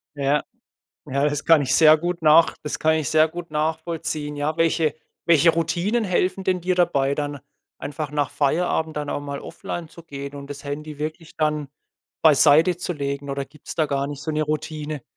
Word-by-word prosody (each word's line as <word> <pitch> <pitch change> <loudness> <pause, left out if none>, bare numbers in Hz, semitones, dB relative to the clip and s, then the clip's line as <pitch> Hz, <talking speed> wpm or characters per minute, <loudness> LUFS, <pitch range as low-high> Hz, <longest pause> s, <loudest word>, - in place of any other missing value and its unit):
Ja. 140 +1 +1 0.6
Ja, 140 +2 -1
das 145 -1 -3
kann 160 -3 +5
ich 135 0 0
sehr 155 -1 +7
gut 175 +1 -3
nach 155 +2 +5
das 150 - -4
kann 160 0 +3
ich 155 -5 -1
sehr 155 0 +5
gut 170 0 -8
nachvollziehen. 155 -1 -2
Ja, 150 +2 -1
welche 165 -2 +2 0.3
welche 165 0 +5
Routinen 180 +8 0
helfen 185 0 0
denn 185 -1 +1
dir 180 +1 0
dabei 140 -6 +2
dann 145 -2 -3 0.4
einfach 145 0 -5
nach 145 -2 0
Feierabend 160 +1 0
dann 150 -1 -3
auch - - -2
mal 140 -1 -5
offline 170 -2 -6
zu 170 - -14
gehen 140 -1 -7
und 140 0 -9
das 145 0 -8
Handy 150 +1 -6
wirklich 155 +2 -6
dann 150 -2 0 0.5
beiseitezulegen 150 -2 +3
oder 140 0 -3
gibt's 150 +1 -11
da 155 -2 +1
gar 140 -1 -1
nicht 145 0 -7
so 160 - -3
'ne 155 0 0
Routine? 150 -1 -4
155 Hz, 180 wpm, -23 LUFS, 145-165 Hz, 0.6 s, sehr